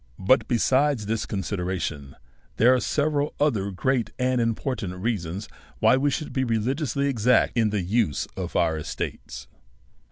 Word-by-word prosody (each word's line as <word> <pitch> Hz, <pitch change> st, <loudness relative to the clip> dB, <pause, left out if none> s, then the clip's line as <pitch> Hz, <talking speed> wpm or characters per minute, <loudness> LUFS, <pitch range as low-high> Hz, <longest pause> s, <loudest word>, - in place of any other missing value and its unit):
But, 100 Hz, +8 st, +3 dB
besides 130 Hz, 0 st, +2 dB
this 110 Hz, +1 st, -2 dB
consideration, 90 Hz, -7 st, -3 dB, 0.4 s
there 120 Hz, +4 st, +6 dB
are 130 Hz, -, +3 dB
several 145 Hz, +2 st, 0 dB
other 110 Hz, -10 st, +1 dB
great 120 Hz, +6 st, 0 dB
and 125 Hz, -1 st, +1 dB
important 115 Hz, -4 st, -2 dB
reasons 95 Hz, -2 st, -3 dB, 0.3 s
why -, -, +4 dB
we 140 Hz, +2 st, +2 dB
should 150 Hz, +3 st, -4 dB
be 130 Hz, -, +1 dB
religiously 130 Hz, +4 st, -1 dB
exact 125 Hz, -2 st, +2 dB
in 115 Hz, -3 st, +3 dB
the 105 Hz, -3 st, -1 dB
use 95 Hz, -, 0 dB
of 90 Hz, -2 st, -5 dB
our 80 Hz, -2 st, +2 dB
estates. -, -, -6 dB
115 Hz, 140 wpm, -25 LUFS, 95-130 Hz, 0.4 s, there